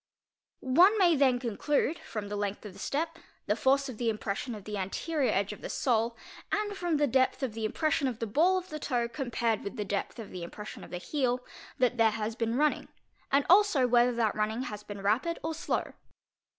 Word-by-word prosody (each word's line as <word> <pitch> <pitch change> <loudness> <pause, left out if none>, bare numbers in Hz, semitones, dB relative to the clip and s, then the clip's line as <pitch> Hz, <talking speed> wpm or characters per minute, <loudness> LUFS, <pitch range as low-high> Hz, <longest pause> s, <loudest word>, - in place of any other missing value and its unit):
One 355 +12 +5
may 355 -4 +5
then 265 -3 +4
conclude, 270 +6 0
from 215 -3 -6
the 205 - -4
length 205 +1 -3
of 205 - -8
the - - -13
step, 330 +3 -2 0.3
the 210 - +1
force 275 +4 +2
of 250 -5 -8
the 235 -2 +1
impression 215 +2 -3
of 205 - -9
the 210 +2 -5
anterior 255 - -1
edge 200 +1 0
of 210 - -12
the - - -6
sole; 230 -2 +1 0.3
and 415 -1 -1
from 350 -4 0
the 295 - +3
depth 260 +1 +2
of 250 -5 -1
the 220 0 -3
impression 285 +4 +1
of 245 -4 -3
the 230 - -2
ball 330 - +3
of 370 0 -5
the 305 - -5
toe, 245 -5 0
comparec 235 -4 -1
with 200 - -5
the 210 -3 -3
depth 200 0 -3
of 225 -3 -8
the 180 - -6
impression 210 +5 -8
of - - -11
the 180 - -4
heel, 250 +4 -1 0.3
that 250 -1 +2
there 225 -1 +5
has 220 +1 -3
been 230 0 -1
run 300 +1 +4
ning, - - -8 0.4
and 280 0 +3
also 370 -8 +5
whether 245 0 +4
that 225 -3 +1
running 215 +3 -1
has 210 -5 -6
been 205 -1 -8
rapid 250 +12 +1
or 320 +1 -2
slow. 320 - -2
245 Hz, 220 wpm, -30 LUFS, 215-295 Hz, 0.4 s, One